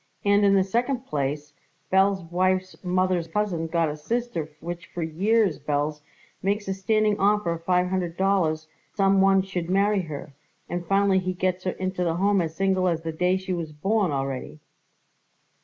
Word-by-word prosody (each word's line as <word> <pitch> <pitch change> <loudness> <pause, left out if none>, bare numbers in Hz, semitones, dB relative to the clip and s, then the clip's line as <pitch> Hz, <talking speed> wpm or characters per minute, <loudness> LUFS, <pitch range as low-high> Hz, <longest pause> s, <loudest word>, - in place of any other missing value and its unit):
And, 205 0 +4
in 200 -1 +5
the 190 - +4
second 240 +6 -1
place, 145 0 -3 0.4
Belz's 190 0 +3
wife's 185 +1 0
mother's 185 -1 +1
a - - -23
cousin 185 -6 -1
got 165 0 +1
a 150 - -3
sister 200 -1 -3
which 175 +3 -6
for 175 - -5
years, 195 +3 +1
Belz, 150 +1 -1 0.4
makes 205 +2 -1
a 190 - 0
standing 210 +2 +1
offer 205 -3 +2
of 165 0 -5
five 180 0 +2
hundred 180 -2 -2
dollars 170 -5 +1 0.3
some 195 -1 +4
one 195 0 +4
should 180 -3 -4
marry 200 +1 +2
her, 150 -4 -7 0.3
and 175 0 -4
finally 195 0 +3
he 185 0 -2
gets 185 0 -1
her 185 - 0
into 185 -1 -2
the 165 -2 0
Home 200 +2 +2
as 160 -1 -4
single 190 -1 +1
as 165 -2 0
the 165 - -3
day 180 +3 +1
she 190 0 -4
was 165 -3 -4
born 195 +5 +1
already." 135 +1 -3
185 Hz, 180 wpm, -25 LUFS, 165-195 Hz, 0.4 s, in